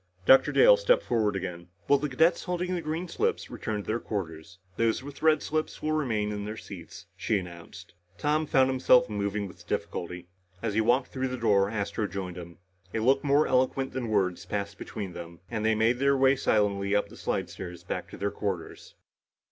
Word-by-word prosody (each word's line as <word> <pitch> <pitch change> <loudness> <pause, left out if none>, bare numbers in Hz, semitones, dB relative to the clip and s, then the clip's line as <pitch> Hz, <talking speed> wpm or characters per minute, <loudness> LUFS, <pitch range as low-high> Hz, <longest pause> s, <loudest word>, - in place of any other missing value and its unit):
Dr. 135 - +6
Dale - - +7
stepped - - +3
forward 110 -4 +1
again. 90 -2 -5 0.2
"Will 140 - +5
the 150 +1 -2
cadets 160 +6 +2
holding 180 0 -1
green 165 +2 -3
slips - - -1
return 105 -2 -3
to - - -19
their 110 +2 0
quarters. 90 -5 -5 0.2
Those 115 +3 +1
with 140 0 -10
red 155 -1 +4
slips 155 0 -2
will 155 - 0
remain 115 -9 0
in 105 -1 -4
their 105 +2 -5
seats," 85 -7 -10
she 105 - 0
announced. 85 -3 -9 0.2
Tom 150 +4 +1
found 130 -2 +4
himself 130 -3 +4
moving 100 0 -2
with 90 - -15
difficulty. 90 0 -4 0.3
As 110 0 -2
he 110 - +2
walked 120 +4 +2
through 130 0 -2
the 130 0 -4
door, 100 -4 +3
Astro 105 0 -2
joined 95 -3 -5
him. 85 -1 -9 0.4
A - - +1
look 135 +5 +3
more 145 +1 +4
eloquent 130 +1 +1
than 125 -3 -3
words 95 -4 +1
passed 100 0 -4
between 100 -4 -6
them 85 0 -9
and 110 -2 -2
they 110 0 +3
made 115 +3 +2
their 140 0 +3
way 135 +1 +5
silently 100 -4 +1
up 105 - +1
the - - -13
slidestairs 90 -2 -4
back - - -4
to - - -10
their 100 +2 -1
quarters. 95 -5 -5
110 Hz, 195 wpm, -28 LUFS, 100-135 Hz, 0.4 s, Dale